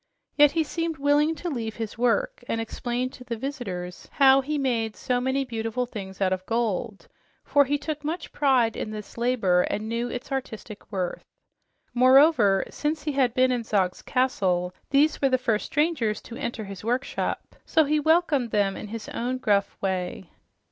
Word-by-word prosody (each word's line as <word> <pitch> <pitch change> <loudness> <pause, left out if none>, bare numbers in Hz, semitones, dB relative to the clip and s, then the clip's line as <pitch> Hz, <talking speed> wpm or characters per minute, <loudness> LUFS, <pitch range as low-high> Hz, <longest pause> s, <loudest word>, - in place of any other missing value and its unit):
Yet 295 -1 +6
he 325 0 +2
seemed 330 0 -3
willing 290 +3 +2
to 335 +4 -6
leave 225 -5 -4
his 225 -2 -5
work 240 0 0
and 225 - -1
explain 240 +2 -3
to 250 - -12
the 235 -2 -4
visitors 200 -10 -5
how 270 -1 +6
he 300 +3 -2
made 230 -6 -1
so 250 -2 -1
many 265 +2 0
beautiful 225 0 -2
things 195 -5 -8
out 190 -1 +2
of 185 0 -4
gold, 225 -3 -2 0.4
for 285 -1 +4
he 290 +2 0
took 300 0 -5
much 325 +3 -4
pride 255 -6 +2
in - - -4
this 215 -1 -8
labor 230 -7 +2
and 210 +4 -2
knew 235 +2 -2
its 250 +3 -6
artistic 220 -5 -6
worth. 185 -3 -3 0.7
Moreover, 255 -5 +5
since 300 0 -2
he 300 - -1
had 265 -3 +1
been 255 -1 +4
in 245 -2 -1
Zog's 190 -5 0
castle 185 -9 0 0.2
these 295 +3 +3
were 275 - +4
the 260 - +3
first 230 -4 -1
strangers 290 -9 0
to 235 - -9
enter 235 -4 -4
his 195 -2 -9
workshop, 245 +4 -2
so 320 - +3
he 300 +2 +2
welcomed 310 -5 +2
them 200 -2 +1
in - - -7
his 225 +1 -7
own 250 +2 -2
gruff 205 -5 +1
way. 185 -1 -3
245 Hz, 180 wpm, -25 LUFS, 215-280 Hz, 0.7 s, Yet